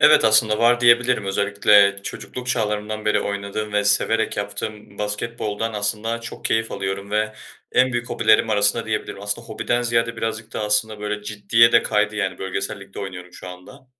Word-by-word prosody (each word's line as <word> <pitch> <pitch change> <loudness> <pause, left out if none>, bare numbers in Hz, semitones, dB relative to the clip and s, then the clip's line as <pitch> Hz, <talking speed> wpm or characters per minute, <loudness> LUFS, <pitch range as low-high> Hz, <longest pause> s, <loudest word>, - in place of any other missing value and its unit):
Evet, 150 - +6
aslında 110 0 +4
var, 120 +1 +4
diyebilirim. 120 -2 +4
Özellikle 100 0 +3
çocukluk 125 +5 -7
çağlarımdan 110 -3 -2
beri 105 - +2
oynadığım 100 +1 -4
ve 105 0 +1
severek 110 +2 +1
yaptığım 105 0 -6
basketboldan 105 +1 -3
aslında 105 +2 -2
çok 115 - -9
keyif 115 0 0
alıyorum. 100 +1 -4
Ve 105 +1 0 0.4
en 130 0 +3
büyük 120 0 -2
hobilerim 110 0 +3
arasında, 105 +2 +2
diyebilirim. 110 -2 -3
Aslında 105 +3 -4
hobiden 120 +2 -1
ziyade 115 -1 0
birazcık 115 0 -4
da - - -4
aslında, 105 0 0
böyle, 105 0 -4
ciddiye 110 +2 +3
de 115 - +5
kaydı. 105 -1 0
Yani 100 -3 -2
bölgesel 95 +2 -4
ligde 100 0 -12
oynuyorum 90 -2 -8
şu 90 - -10
anda. 90 +10 -13
105 Hz, 165 wpm, -22 LUFS, 100-115 Hz, 0.4 s, Evet